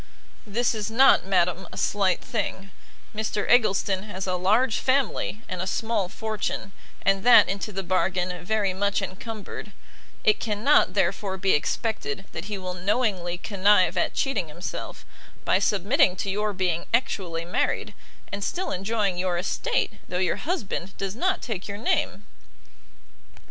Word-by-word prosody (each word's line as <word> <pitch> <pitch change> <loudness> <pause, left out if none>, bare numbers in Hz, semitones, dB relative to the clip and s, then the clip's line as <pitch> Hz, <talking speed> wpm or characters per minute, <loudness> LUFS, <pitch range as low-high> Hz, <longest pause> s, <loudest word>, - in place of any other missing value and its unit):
"This 240 +4 +1
is 215 -1 -3
not, 245 -4 +5
madam, 180 -1 +1
a - - -9
slight 195 -3 +1
thing; 195 -3 -3 0.4
Mr 215 -1 -2
Eggleston 200 -5 +3
has 195 -2 -5
a 185 - -1
large 215 +7 +2
family 260 -5 0
and 180 -1 -4
a 185 - -3
small 215 -2 -1
fortune, 215 -2 -3 0.3
and 195 0 +2
that, 245 - +8
into 200 +2 -3
the 195 -1 -4
bargain, 180 0 0
very 205 0 0
much 200 +1 0
encumbered; 210 +1 -7 0.5
it 215 - +4
cannot, 220 +6 +3
therefore, 195 0 0
be 190 0 +1
expected 195 - -1
that - - -6
he 205 -1 -4
will 185 -1 -5
knowingly 185 -2 0
connive 190 -2 +3
at - - 0
cheating 235 - 0
himself, 170 +4 -7 0.4
by - - +3
submitting 205 - +3
to 195 - -2
your 210 +2 0
being 180 -3 -1
actually 185 -9 -2
married, 175 - -1 0.4
and 200 0 -4
still 370 - -2
enjoying 195 -1 -1
your 180 -1 0
estate 480 - -1
though 180 - -2
your 185 -1 +1
husband 205 - -3
does 195 0 -3
not 370 +8 0
take 210 -6 -4
your 200 0 -5
name." 235 - 0
200 Hz, 150 wpm, -25 LUFS, 185-220 Hz, 0.5 s, that